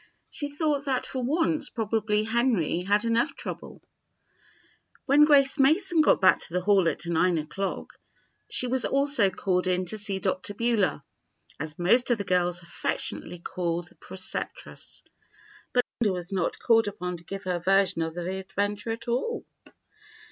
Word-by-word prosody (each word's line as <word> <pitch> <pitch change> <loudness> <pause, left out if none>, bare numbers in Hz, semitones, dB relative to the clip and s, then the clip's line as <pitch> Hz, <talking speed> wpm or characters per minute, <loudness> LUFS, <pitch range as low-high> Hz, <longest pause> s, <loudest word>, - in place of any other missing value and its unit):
She 290 -2 -3
thought 290 -1 -1
that 265 -2 0
for 260 - -4
once 315 +4 0
probably 215 -2 0
Henry 225 - +1
had 205 +4 +1
enough 230 +5 +1
trouble! - - -8 1.2
When 290 +2 +6
Grace 280 -1 +4
Mason 325 +5 +4
got 305 - +4
back 185 -1 +5
to - - -6
the 180 - +1
Hall 190 -3 +3
at - - -5
nine 170 +1 +2
o'clock, 190 +6 -4 0.6
she - - +2
was 255 +1 0
also 275 -7 +3
called 185 -1 -1
in 185 0 +1
to 215 +5 -2
see 200 -2 -1
"Dr. 190 +1 -2
Beulah," 230 -4 +1 0.6
as 155 +1 -5
most 235 +10 +3
of 240 - +3
the 200 - -3
girls 180 -2 0
affectionately 175 +1 -2
called 175 0 -3
the - - -23
preceptress. 190 - -3 0.7
But 245 -1 +2
Linda 210 -5 +2
was 180 +2 -5
not 185 -3 -1
called 225 -2 +3
upon 180 -3 -4
to 170 - -16
give 195 +3 -7
her 180 -2 -1
version 195 -1 +2
of 160 0 -3
the 180 +2 -3
adventure 205 +3 -3
at 225 +1 -5
all. 260 - -2
205 Hz, 160 wpm, -27 LUFS, 180-250 Hz, 1.2 s, When